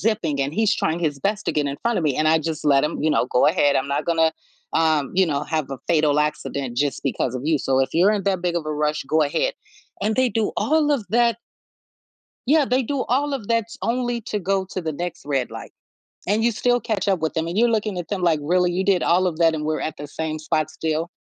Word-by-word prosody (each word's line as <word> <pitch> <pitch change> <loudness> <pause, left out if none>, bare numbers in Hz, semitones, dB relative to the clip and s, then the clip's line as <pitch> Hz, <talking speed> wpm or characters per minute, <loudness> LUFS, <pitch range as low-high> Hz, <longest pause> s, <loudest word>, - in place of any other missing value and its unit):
zipping, 175 -9 0
and 140 +2 -1
he's 220 -1 +2
trying 160 +2 -1
his 150 -5 -1
best 210 +1 -1
to - - +1
get 150 -1 0
in 140 0 -3
front 235 -1 +1
of - - -1
me, 140 -3 +1
and 155 - +1
I, 160 +1 +4
just, 160 -1 -4
let 140 -2 +4
him, 150 - -2
you 155 - +2
know, 125 - +2
go 125 - +3
ahead. 145 -3 +3
I'm 135 - 0
not 140 +2 -1
gonna, 165 -1 +2 0.4
um, 155 -3 +1
you 190 0 +4
know, 145 -1 -1
have 155 -4 -2
a 135 - -5
fatal 150 -3 +2
accident, 140 -4 -2
just, 140 -1 -1
because 130 -1 -1
of 125 - -6
you. 160 -1 +3
So, 135 -1 0
if 135 - +1
you're 185 +5 +5
in 205 -3 -1
that 190 -3 0
big 175 -1 0
of 155 -2 -3
a 155 - -2
rush, 150 0 -1
go 155 +3 +2
ahead, - - 0 0.5
and 215 +3 0
they 255 -1 +3
do 220 0 0
all 305 0 +2
of 250 -8 0
that 235 -1 +3 1.1
Yeah, 295 0 +4
they 255 +1 +1
do 275 +2 -2
all 280 +3 +1
of 230 -7 -5
that 230 -2 +2 0.2
only 240 0 -1
to 210 0 -3
go 195 0 0
to 185 - -3
the 160 -1 -3
next 175 +3 -5
red 135 -4 -1
light, - - -8 0.6
and 215 +3 +1
you 235 - +3
still 245 +2 +1
catch 210 -4 -2
up 190 -3 +2
with 160 0 -2
them 160 -1 -1
and 175 +4 -4
you're 235 +1 +4
looking 215 -3 -1
at 165 - -6
them 190 -1 -3
like, 165 -3 +3
"Really, 180 +3 +2
you 185 +2 -1
did 190 -3 +2
all 180 +2 +3
of 160 -3 -3
that 165 -1 +4
and 150 -1 -3
we're 155 0 -1
at 155 0 -4
the 145 - -7
same 155 +1 -4
spot 155 0 -1
still?" 160 +1 -2
165 Hz, 260 wpm, -22 LUFS, 150-210 Hz, 1.1 s, you're